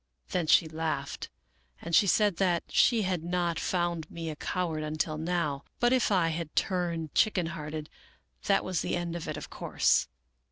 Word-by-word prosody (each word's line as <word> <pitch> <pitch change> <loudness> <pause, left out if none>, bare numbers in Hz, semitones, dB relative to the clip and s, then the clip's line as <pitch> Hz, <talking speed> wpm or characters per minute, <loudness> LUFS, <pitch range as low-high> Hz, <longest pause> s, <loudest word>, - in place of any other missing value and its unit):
Then 175 -3 -1
she 160 - +5
laughed, 155 -3 -3 0.5
and 170 - -1
said 205 -1 +4
that 180 -3 +2
she 230 -3 +4
had 180 -3 -1
not 175 -1 0
found 175 -3 -1
me 165 -1 -5
a - - -6
coward 165 -1 -2
until 155 0 -2
now, 160 -4 -1 0.2
but 240 - +4
that 255 - +4
if 250 -4 +1
I 180 -4 +3
had 160 -1 -4
turned 170 -4 -1
chicken 200 -5 +3
hearted, 155 -2 -5 0.6
that 195 - +2
was 185 -3 -1
the - - -1
end 175 -1 -3
of 170 - -5
it, - - -3
of - - -8
course. - - +2
170 Hz, 175 wpm, -29 LUFS, 160-180 Hz, 0.6 s, she